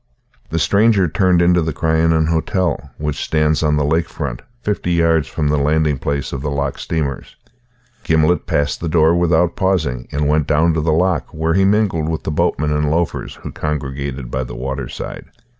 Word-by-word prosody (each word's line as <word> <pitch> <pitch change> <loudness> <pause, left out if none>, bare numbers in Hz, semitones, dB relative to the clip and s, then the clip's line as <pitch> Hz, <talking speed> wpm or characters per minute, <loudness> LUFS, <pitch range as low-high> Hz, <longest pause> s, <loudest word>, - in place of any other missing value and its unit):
The 80 - -2
stranger 100 +2 +3
turned 90 +1 +2
into 90 0 +4
the 80 -1 -2
Crianan 80 0 +2
Hotel, 85 -1 -1
which 75 -1 -3
stands 75 -1 +1
on 75 -1 +2
the 75 -1 +1
lake 80 +3 +1
front, 65 -6 -5 0.2
fifty 100 -5 -1
yards 80 -2 +2
from 75 -2 -1
the 75 0 +2
landing 75 0 +1
place 70 0 -3
of 70 - -4
the 70 - -2
loch 70 -1 -2
steamers. 75 -5 -3 0.7
Gimblet 80 +2 +2
passed 75 -5 0
the 85 - -3
door 80 0 +4
without 85 0 +2
pausing 80 -11 0
and 75 0 0
went 75 0 +1
down 80 +2 +3
to 80 - 0
the 80 +1 +1
loch, 90 0 +1
where 80 +1 0
he 95 +2 +3
mingled 95 -6 +1
with 80 -1 -3
the - - -3
boatmen 75 0 0
and 75 0 +1
loafers 85 +2 -2
who - - -6
congregated 70 -3 -4
by 65 - -1
the 60 -1 -8
waterside. 65 0 -5
80 Hz, 185 wpm, -18 LUFS, 75-85 Hz, 0.7 s, into